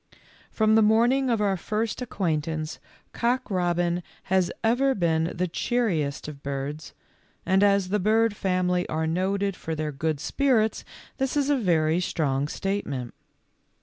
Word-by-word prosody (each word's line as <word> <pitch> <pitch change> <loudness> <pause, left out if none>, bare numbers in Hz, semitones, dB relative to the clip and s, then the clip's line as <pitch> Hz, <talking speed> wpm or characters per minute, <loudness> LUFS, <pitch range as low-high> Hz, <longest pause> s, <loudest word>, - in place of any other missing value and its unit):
Feom 220 -1 +4
the 220 - +6
morning 240 +5 +3
of 230 -3 +1
our 200 -2 +2
first 215 +6 -2
acquaintance 160 -8 -2 0.3
Cock 245 0 -1
robin 175 -1 0 0.3
has 185 -2 +3
ever 260 +4 +2
been 160 -3 +1
the 180 +2 -2
cheeriest 165 -10 -1
of 145 -2 -9
birds, 140 +2 -5 0.5
and 190 +1 +3
as 200 -2 +3
the 210 +2 +1
bird 220 +2 +2
family 180 -2 0
are 160 0 -1
noted 195 +4 0
for 160 -2 -5
their 155 -1 -2
good 155 +1 -2
spirits, 225 - +1 0.4
this 270 +2 0
is 285 0 +2
a - - +4
very 170 - +2
strong 145 -6 0
state 195 +6 -2
ment. 125 -4 -5
185 Hz, 150 wpm, -26 LUFS, 160-220 Hz, 0.5 s, the